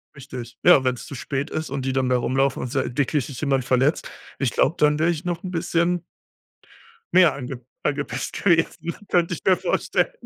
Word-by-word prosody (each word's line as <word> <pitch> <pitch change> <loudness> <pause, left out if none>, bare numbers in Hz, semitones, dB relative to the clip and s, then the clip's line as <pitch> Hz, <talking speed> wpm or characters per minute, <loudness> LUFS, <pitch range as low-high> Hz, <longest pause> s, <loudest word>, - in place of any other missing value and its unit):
Richtig. 125 -4 -9
Ja, 175 -7 +7
wenn's 125 -1 -1
zu - - -9
spät 140 +2 -3
ist 155 0 -4
und 135 0 -3
die 135 - 0
dann 130 -1 +1
da 125 - +3
rumlaufen 135 +2 0
und 125 - -5
sei 135 -1 0
wirklich 145 -1 +1
sich 130 -5 -8
jemand 135 -4 +1
verletzt, 130 +5 +1 0.3
ich 135 -4 +1
glaub, - - +1
dann 150 0 +3
wäre 160 +2 +2
ich 165 +1 -2
noch 175 0 -3
'n 185 - -5
bisschen 170 0 0 1.1
mehr 175 -5 +6
ange 130 -2 -6 0.2
angepisst 135 -3 -2
gewesen, 170 -1 +1
könnte 175 0 +2
ich - - -12
mir 185 -1 +4
vorstellen. - - 0
140 Hz, 195 wpm, -23 LUFS, 130-165 Hz, 1.1 s, Ja